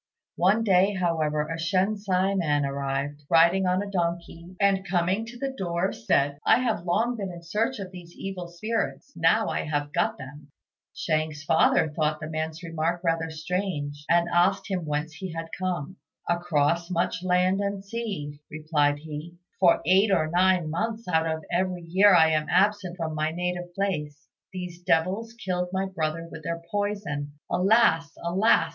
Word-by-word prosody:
One 195 +6 +3
day, 195 -1 +3
however, 160 -4 0
a 165 +1 -4
Shensi 190 +2 +1
man 145 -6 +1
arrived, 140 +1 -3
riding 170 +3 +5
on 185 +2 +1
a 200 - -7
donkey, 170 0 -3
and 200 -1 +3
coming 190 +4 0
to 240 +1 -9
the 270 +2 -3
door 175 -2 -1
said, 140 +5 +1
"I - - +5
have 225 -8 -1
long 225 +8 +1
been 195 -3 -4
in 170 -1 -10
search 225 +9 -1
of 190 -3 -7
these 175 -2 -12
evil 190 -2 -5
spirits: 220 +9 -3
now 165 +7 +3
I - - -1
have 145 -1 -2
got - - +1
them." 140 +2 -10 0.4
Shang's 155 -1 -2
father 160 - +4
thought 155 0 -1
the 155 - -5
man's 160 +1 -4
remark 165 +1 -2
rather 165 -1 0
strange, 160 -3 -3
and 170 0 +4
asked 190 +3 +2
him 180 -4 -2
whence 150 +2 -2
he 185 +2 -6
had 165 0 -5
come. 185 -1 -3 0.3
"Across 170 -1 +1
much 175 0 -1
land 185 +1 +2
and 200 -1 -3
sea," 195 -10 -5
replied 150 -2 +1
he; 155 +2 -8 0.2
"for 175 -3 +5
eight 195 +3 +4
or 175 -5 +3
nine 180 0 +3
months 225 +6 -3
out 165 -2 +2
of 160 -1 -3
every 180 0 -1
year 190 +4 +5
I 160 -2 +6
am 155 -1 0
absent 190 -1 +2
from 160 -2 -3
my 155 0 0
native 175 +1 -3
place. 150 -7 -3 0.2
These 180 -2 -7
devils 190 +8 0
killed 180 -6 -2
my 190 +1 0
brother 165 -3 -3
with - - -8
their 170 0 -4
poison, 200 -9 -2 0.2
alas! 180 -5 +3
alas! 185 +6 +3
175 Hz, 165 wpm, -26 LUFS, 160-190 Hz, 0.4 s, I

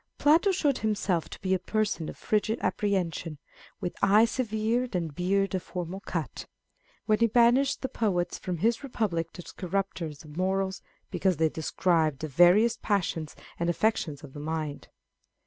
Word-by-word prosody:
Plato 320 +7 +4
showed 295 -8 +1
himself 205 -6 0
to - - -9
be 190 -1 0
a 185 - +2
person 210 -7 -1
of - - -9
frigid 215 +1 0
apprehension, 175 -6 -1 0.2
" - - -23
with 175 - -2
eye 205 +3 +6
severe 230 +1 -1
and 170 -4 -2
beard 195 +4 0
of 185 - 0
formal 180 +2 -5
cut," 165 -8 -5 0.6
when 215 0 +2
he 230 - +5
banished 245 +5 +3
the - - +1
poets 195 -8 -1
from 180 -2 -3
his 230 - +1
Republic 210 -11 -1
as 175 - -9
corrupters 185 -5 -3
of 150 -1 -12
morals, 190 +1 -1 0.3
because 185 -2 +1
they 160 0 +3
described 160 -2 0
the 155 - -2
various 180 - +5
passions 170 -6 -1 0.2
and 170 0 0
affections 175 -6 0
of 140 -3 -11
the 145 - -8
mind. 155 -1 -4
190 Hz, 165 wpm, -28 LUFS, 165-220 Hz, 0.6 s, eye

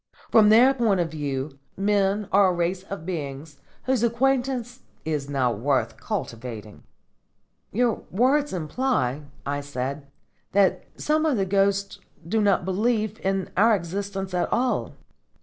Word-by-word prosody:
From 215 -2 +6
their 245 +5 +7
point 225 -7 +1
of 170 -2 -1
view, 140 -2 -4 0.2
men 200 0 +1
are 200 0 +5
a 185 - +2
race 175 +2 -1
of 190 -4 -8
beings 145 -4 -5 0.2
whose 260 -3 +1
acquaintance 245 +1 0 0.3
is 150 -3 -2
not 125 -6 0
worth 135 +2 0
cultivating." 115 -3 -6 0.9
"Your 235 +2 +1
words 275 +8 +2
imply," 155 - -1 0.2
I 145 0 -2
said, 140 0 -4 0.5
"that 195 -1 +3
some 310 +1 +1
of 305 -6 +2
the 195 - +1
ghosts 200 +1 +1 0.3
do 220 +5 +1
not 200 -4 +2
believe 215 +2 0
in 195 -1 -1
our 220 +4 +5
existence 195 +1 -4
at 180 - 0
all." 250 0 0
195 Hz, 135 wpm, -25 LUFS, 150-225 Hz, 0.9 s, their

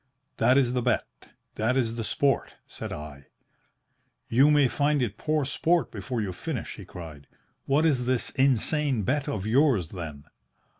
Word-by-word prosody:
"'That 125 +4 +4
is 125 -3 +2
the 125 - 0
bet. 125 0 +1 0.5
That 120 +4 +1
is 115 -3 0
the 115 - -3
sport, 135 +5 0
said - - -8
I.' 75 -2 -8 1.0
"'You 135 +6 +5
may 145 -2 +5
find 145 +3 +1
it 115 -5 -1
poor 155 -2 0
sport 165 +5 +1
before 115 +3 -4
you 95 -3 -3
finish,' 150 - -5
he 100 - -9
cried. 80 -6 -10 0.4
'What 145 +4 +2
is 130 -6 +1
this 130 -2 0
insane 135 -1 +1
bet 145 +8 0
of 105 -8 -3
yours 115 - +3
then?' 80 -6 -7
125 Hz, 160 wpm, -27 LUFS, 105-140 Hz, 1.0 s, You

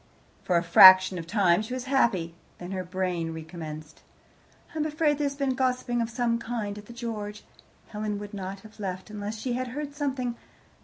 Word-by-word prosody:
For 180 - +1
a 170 - +1
fraction 185 +1 +8
of 165 - -8
time 190 -2 +3
she 235 +4 -5
was 255 - -4
happy. 230 -11 +1 0.2
Then 175 +1 -8
her 185 -1 -3
brain 180 -3 -2
recommenced. 155 -1 -8 0.7
"I 315 - -4
am 305 - +1
afraid 300 -1 +1
there 295 - +1
has 280 0 -2
been 275 -2 0
gossiping 250 -2 0
of 230 - -2
some 235 -1 0
kind 225 -3 -4
at 205 - -14
the - - -10
George. 215 -3 -6 0.5
Helen 210 -1 -3
would 205 +1 -8
not 195 0 -6
have 215 +1 -16
left 185 0 -5
unless 210 +1 -5
she 245 +3 -3
had 255 +1 -2
heard 290 +3 -5
something. 260 -5 -2
210 Hz, 195 wpm, -27 LUFS, 185-250 Hz, 0.7 s, fraction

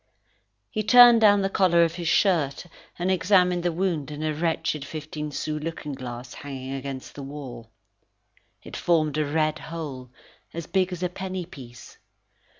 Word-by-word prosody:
He 215 - -1
turned 240 +1 +8
down 205 -2 +6
the - - +2
collar 175 -4 +4
of 165 -1 0
his 170 -1 -5
shirt, 165 -6 +2 0.3
and 180 +2 0
examined 180 -1 +3
the 175 0 0
wound 165 -5 -1
in 150 +1 -6
a 155 0 0
wretched 155 -2 -1
fifteen 155 0 -6
sous 150 +1 -4
looking 150 -2 -5
glass 125 -1 -7
hanging 135 -2 -7
against 135 -1 -6
the 145 - -8
wall. 135 -5 -8 0.9
It - - -9
formed 155 -3 +1
a 155 - +1
red 155 +1 0
hole, 145 -6 -7 0.5
as 170 -1 -4
big 185 +1 0
as 180 0 -5
a 180 - 0
penny 185 0 -5
piece. 125 -7 -13
155 Hz, 160 wpm, -25 LUFS, 140-180 Hz, 0.9 s, turned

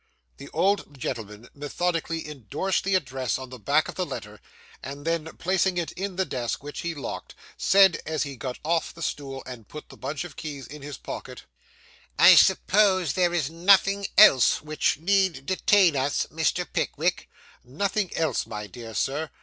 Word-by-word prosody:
The - - -10
old 195 -7 0
gentleman 115 -3 -6
methodically 165 +2 -2
indorsed 150 - -2
the 195 0 +2
address 130 -7 -1
on 130 -1 -9
the 125 - -9
back 105 - +2
of - - -6
the - - -2
letter; - - -7 0.4
and 140 +2 -8
then, 165 -1 0
placing 185 0 +1
it 170 -2 -2
in 195 0 -5
the 190 +1 0
desk, 120 -2 -3
which 145 0 -7
he 170 -1 -3
locked, 140 - -7 0.2
said, 195 -2 +4
as 155 -1 -1
he 140 -2 -6
got 125 +1 -5
off 165 +1 0
the 165 - -7
stool 135 -3 -4
and 125 -5 -9
put 150 - -10
the - - -13
bunch 140 +4 -4
of 175 - -10
keys 145 -4 -7
in 150 +1 -11
his 145 -1 -7
pocket - - -8 0.7
'I - - +9
suppose 190 -6 +4
there 180 -2 +2
is 160 -4 -1
nothing 195 +3 +3
else 135 - +7
which 155 0 0
need 180 -4 +1
detain 185 -1 +3
us, 135 +1 0
Mr. 160 -1 0
Pickwick?' - - -1 0.3
'Nothing 195 - -1
else, 160 -1 0
my 105 -1 -6
dear 115 +2 -10
Sir! 150 +7 -1
155 Hz, 175 wpm, -25 LUFS, 135-185 Hz, 0.7 s, I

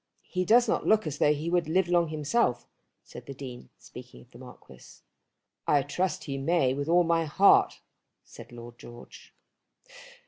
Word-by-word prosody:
"He 185 -1 -1
does 240 +5 +4
not - - -1
look 215 -3 +3
as 150 -2 -5
though 150 - +3
he 150 +2 -3
would 175 -3 0
live 185 +2 +1
long 175 -1 +2
himself," 155 - -1 0.4
said - - -13
the 140 - -8
Dean, 125 - -10
speaking - - -13
of - - -28
the - - -15
Marquis. - - -16 0.6
"I 145 -2 +3
trust 180 +7 -3
he 135 -2 -5
may 135 -2 +1
with 140 +3 -4
all 175 +1 +4
my 165 -1 0
heart," 190 +6 +3 0.4
said - - -14
Lord 120 0 -12
George. 120 0 -14
155 Hz, 170 wpm, -27 LUFS, 135-175 Hz, 0.6 s, does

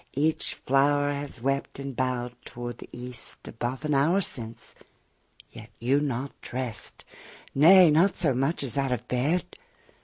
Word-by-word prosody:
Each 155 +3 +1
flower 145 +2 +2
has 140 -4 -6
wept 135 +1 -1
and 135 -1 -6
bow'd 125 -1 -1
toward 120 -1 -7
the - - -11
east 125 0 -9
Above 125 +6 -4
an 150 - +1
hour 150 +8 +3
since, 115 - -2 0.8
yet - - -11
you 130 +5 +2
not 140 -2 -2
drest; 125 -4 -5 0.5
Nay! 170 +4 +8
not 175 +6 +4
so 150 -5 +2
much 135 +5 0
as 135 +1 -1
out 135 -1 0
of 125 -1 -2
bed? 145 +9 +1
135 Hz, 150 wpm, -27 LUFS, 125-145 Hz, 0.8 s, Nay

